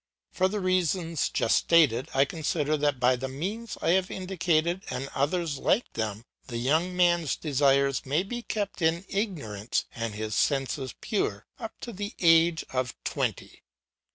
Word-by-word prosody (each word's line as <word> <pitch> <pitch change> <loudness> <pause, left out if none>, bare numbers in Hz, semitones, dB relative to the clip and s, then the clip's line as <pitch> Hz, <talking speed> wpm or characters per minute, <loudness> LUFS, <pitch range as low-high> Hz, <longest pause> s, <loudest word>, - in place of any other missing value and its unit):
For 185 - +2
the 210 +2 -2
reasons 180 -3 0
just - - +2
stated, 145 -8 +3
I 135 +1 +5
consider 155 0 -1
that 145 -3 0
by 125 +1 +4
the 130 +2 -4
means 195 - -5
I - - +2
have 185 +1 +2
indicated 180 -1 0
and 130 +2 -3
others 150 +1 0
like 235 - +1
them 110 0 -3 0.2
the 120 - -4
young 160 +9 +1
man's 175 -3 +3
desires 140 -2 +2
may 145 +6 0
be 240 +5 -5
kept 205 -5 -3
in 165 +3 +1
ignorance 145 - -2
and 115 -2 -4
his 110 0 -4
senses 135 0 0
pure 105 - -1
up 225 -3 -7
to 235 - -6
the 205 +2 -5
age 165 -1 +4
of 130 -2 -2
twenty. - - -3
160 Hz, 155 wpm, -27 LUFS, 135-185 Hz, 0.2 s, I